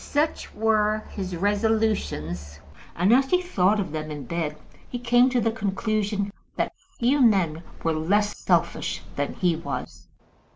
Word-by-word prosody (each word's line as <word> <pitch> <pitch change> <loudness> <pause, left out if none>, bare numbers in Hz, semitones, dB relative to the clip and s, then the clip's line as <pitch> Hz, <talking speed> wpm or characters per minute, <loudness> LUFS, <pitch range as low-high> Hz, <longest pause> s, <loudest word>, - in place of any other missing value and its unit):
Such 300 +2 -1
were 215 0 +2
his 185 -3 -4
resolutions, 200 - 0 0.4
and, 185 +6 +4
as 265 +2 +4
he 360 - +4
thought 210 - +2
of 190 - -2
them 155 0 -4
in 150 -2 -5
bed, 160 -3 -3 0.3
he 245 - -3
came 245 +1 +4
to 250 -1 +1
the 225 0 +1
conclusion 205 -1 -1 0.2
that - - -1 0.2
few 265 +4 +3
men 185 -9 +3 0.2
were 165 - +2
less 205 +7 +1
selfish - - 0
than - - -1
he 180 -5 +2
was. 165 +2 -6
205 Hz, 150 wpm, -25 LUFS, 170-225 Hz, 0.4 s, and